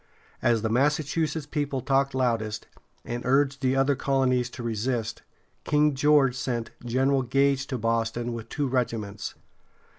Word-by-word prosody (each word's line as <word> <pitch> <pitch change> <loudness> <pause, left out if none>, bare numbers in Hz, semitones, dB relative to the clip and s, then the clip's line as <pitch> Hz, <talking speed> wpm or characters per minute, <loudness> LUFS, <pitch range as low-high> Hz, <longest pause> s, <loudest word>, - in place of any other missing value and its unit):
As 115 -2 +2
the 110 - 0
Massachusetts 150 +4 0
people 145 -2 -2
talked 135 0 +1
loudest, 115 -4 -1 0.4
and 120 0 -4
urged 140 +2 +2
the 130 0 +2
other 135 +1 +3
colonies 130 -2 +1
to 120 - -8
resist, 115 0 -2 0.4
King 150 0 +3
George 140 -2 +4
sent 120 -4 -3
General 130 +3 +2
Gage 135 +2 +1
to 130 - -3
Boston 115 +1 -1
with 115 -1 -7
two 145 - -1
regiments. 115 -5 -2
130 Hz, 140 wpm, -26 LUFS, 115-140 Hz, 0.4 s, George